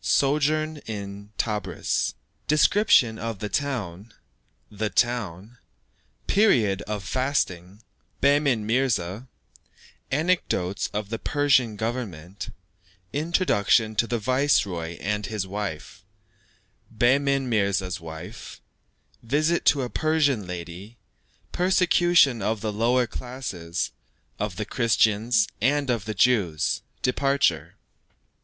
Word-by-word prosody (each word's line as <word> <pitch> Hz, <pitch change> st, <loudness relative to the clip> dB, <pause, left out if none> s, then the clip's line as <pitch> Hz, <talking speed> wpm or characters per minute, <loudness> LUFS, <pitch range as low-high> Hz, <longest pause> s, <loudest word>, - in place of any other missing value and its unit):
SOJOURN 155 Hz, +2 st, +1 dB
IN 100 Hz, -1 st, -7 dB
TEBRIS. 105 Hz, -2 st, -1 dB, 0.3 s
DESCRIPTION 150 Hz, -, +4 dB
OF 115 Hz, -2 st, -4 dB
THE 105 Hz, +2 st, -5 dB
TOWN 110 Hz, -8 st, -3 dB, 0.6 s
THE 105 Hz, +1 st, -2 dB
TOWN 115 Hz, -2 st, -1 dB, 0.7 s
PERIOD 115 Hz, -, +3 dB
OF 105 Hz, -2 st, -3 dB
FASTING 100 Hz, -6 st, -2 dB, 0.4 s
BEHMEN 140 Hz, -5 st, +3 dB
MIRZA 110 Hz, -3 st, 0 dB, 0.8 s
ANECDOTES 140 Hz, -, 0 dB
OF 105 Hz, -1 st, -4 dB
THE 115 Hz, 0 st, -4 dB
PERSIAN 135 Hz, -6 st, +2 dB
GOVERNMENT 100 Hz, -6 st, -5 dB, 0.6 s
INTRODUCTION 145 Hz, -, +2 dB
TO 115 Hz, -, +2 dB
THE 120 Hz, -, -1 dB
VICEROY 105 Hz, -, 0 dB
AND 105 Hz, +1 st, -2 dB
HIS 105 Hz, -3 st, -3 dB
WIFE 95 Hz, -3 st, -6 dB, 0.9 s
BEHMEN 135 Hz, +3 st, +2 dB
MIRZA'S 100 Hz, -5 st, 0 dB
WIVES 80 Hz, -1 st, -9 dB, 0.6 s
VISIT 155 Hz, +8 st, +1 dB
TO 140 Hz, -3 st, +4 dB
A 125 Hz, -, -4 dB
PERSIAN 145 Hz, -, +1 dB
LADY 90 Hz, +5 st, -8 dB, 0.5 s
PERSECUTION 175 Hz, -, +3 dB
OF 105 Hz, +1 st, -1 dB
THE 110 Hz, -1 st, -2 dB
LOWER 120 Hz, +4 st, +2 dB
CLASSES, 115 Hz, -10 st, -5 dB, 0.5 s
OF 105 Hz, -3 st, -2 dB
THE 105 Hz, -, -3 dB
CHRISTIANS, 110 Hz, -1 st, +2 dB
AND 140 Hz, +2 st, +2 dB
OF 115 Hz, -4 st, -2 dB
THE 110 Hz, -1 st, -4 dB
JEWS 95 Hz, -9 st, +2 dB, 0.2 s
DEPARTURE. 135 Hz, +2 st, +1 dB
115 Hz, 100 wpm, -25 LUFS, 100-135 Hz, 0.9 s, DESCRIPTION